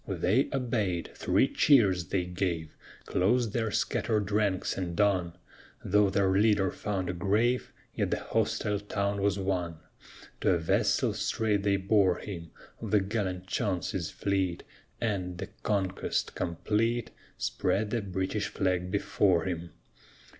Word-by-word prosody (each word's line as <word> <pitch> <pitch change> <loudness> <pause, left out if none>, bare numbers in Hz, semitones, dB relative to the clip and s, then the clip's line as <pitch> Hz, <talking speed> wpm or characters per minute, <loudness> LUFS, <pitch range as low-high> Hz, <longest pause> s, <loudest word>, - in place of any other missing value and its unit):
They 95 - +1
obeyed. 110 -10 -1
Three - - +2
cheers 100 - +4
they 95 +2 0
gave, 85 -3 -3 0.3
Closed 110 +4 +1
their 110 -2 0
scattered 105 0 0
ranks, 100 -3 +1
and 85 -3 -4
on. 95 -5 +2 0.5
Though 105 +1 +4
their 95 0 +2
leader 100 -1 +3
found 95 -3 -3
a 90 - -1
grave, 105 +8 +1 0.2
Yet - - -1
the - - 0
hostile 105 -1 0
town 100 0 -2
was 100 0 +2
won. 90 -4 -2 0.6
To 90 - +3
a - - +2
vessel 80 -1 +1
straight 105 -3 0
they 100 0 +2
bore 95 -2 +3
him 85 -5 -7 0.3
Of - - -5
the 105 - +4
gallant 95 -2 -2
Chauncey's 95 -4 -2
fleet, 95 -3 -1 0.4
And, 95 -6 -2
the - - -6
conquest 95 -3 -1
complete, 110 +7 -1 0.3
Spread 100 +4 0
the 120 - 0
British 95 +2 -2
flag 90 -1 -1
before 100 -2 +2
him. 85 -2 -3
100 Hz, 135 wpm, -29 LUFS, 90-105 Hz, 0.6 s, cheers